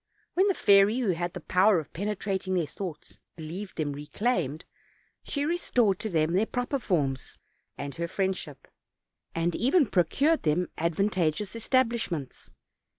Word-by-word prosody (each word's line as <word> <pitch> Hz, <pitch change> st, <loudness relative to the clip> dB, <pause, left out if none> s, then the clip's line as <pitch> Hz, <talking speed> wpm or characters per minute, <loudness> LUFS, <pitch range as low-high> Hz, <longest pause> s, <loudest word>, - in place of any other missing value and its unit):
When 380 Hz, +3 st, +3 dB
the 390 Hz, -, +2 dB
fairy, 200 Hz, +3 st, +5 dB
who 240 Hz, -7 st, +1 dB
had 175 Hz, 0 st, -3 dB
the -, -, -5 dB
power 185 Hz, +4 st, +4 dB
of 155 Hz, -3 st, -5 dB
penetrating 195 Hz, 0 st, -2 dB
their 175 Hz, -3 st, +1 dB
thoughts, 155 Hz, +1 st, -7 dB, 0.2 s
believed 175 Hz, +5 st, -7 dB
them 145 Hz, -2 st, -1 dB
reclaimed, 155 Hz, -, -2 dB, 0.6 s
she 285 Hz, 0 st, -2 dB
restored 245 Hz, -, +1 dB
to 220 Hz, -, -3 dB
them 160 Hz, -2 st, +1 dB
their 205 Hz, +5 st, +2 dB
proper 245 Hz, +2 st, -2 dB
forms 140 Hz, -, -1 dB, 0.4 s
and 140 Hz, 0 st, -5 dB
her 170 Hz, 0 st, -3 dB
friendship; 185 Hz, -7 st, -3 dB, 0.7 s
and 165 Hz, +1 st, 0 dB
even 280 Hz, -, +3 dB
procured 270 Hz, -, +2 dB
them 165 Hz, +3 st, +1 dB
advantageous 175 Hz, +2 st, 0 dB
establishments. 230 Hz, -, -1 dB
185 Hz, 140 wpm, -28 LUFS, 160-225 Hz, 0.7 s, fairy